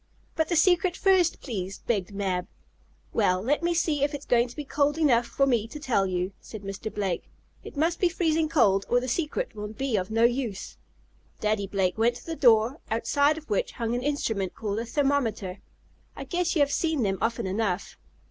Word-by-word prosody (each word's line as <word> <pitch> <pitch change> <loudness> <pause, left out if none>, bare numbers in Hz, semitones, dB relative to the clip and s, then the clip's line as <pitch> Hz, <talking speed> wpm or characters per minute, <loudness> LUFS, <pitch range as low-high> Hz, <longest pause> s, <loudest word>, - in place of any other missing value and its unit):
"But 320 -1 0
the 345 - +1
secret 355 +2 +3
first, 375 -4 +3
please," 195 -7 -4
begged 205 -5 -1
Mab. 190 -3 -2 0.7
"Well, 185 -4 +2
let 270 +11 0
me 345 0 +1
see 310 -4 +1
if 290 +1 0
it - - -2
is - - -13
going 240 0 +3
to 240 - -13
be 295 - -5
cold 290 +2 +1
enough 245 -7 +3
for 275 +4 +1
me 235 -5 +1
to 300 - -8
tell 230 -10 +1
you," 180 +1 -1
said 215 -2 -9
Mr. 195 +2 -5
Blake. 195 -4 -3 0.3
"It - - -10
must 330 +3 +1
be 360 - +3
freezing 325 -2 +1
cold, 200 -11 +3
or 245 - +4
the 255 - -5
secret 335 - -2
will 210 0 -5
be 230 +2 -2
of 185 -1 -2
no 225 +1 +2
use." 240 -4 0 0.6
Daddy 210 -2 0
Blake 190 0 0
went 235 +2 +3
to - - -11
the 330 - -4
door, 240 0 +4
outside 285 +7 +2
of 315 - -10
which 205 - -1
hung 230 -1 -2
an 245 - -1
instrument 225 -9 -1
called 210 -1 -3
a 230 - -4
thermometer. 230 -9 0 0.6
I - - -6
guess 355 -1 -1
you 305 - +3
have 285 0 +3
seen 315 -5 0
them 195 -2 0
often 230 -2 0
enough. 190 -1 -2
240 Hz, 205 wpm, -27 LUFS, 205-300 Hz, 0.7 s, or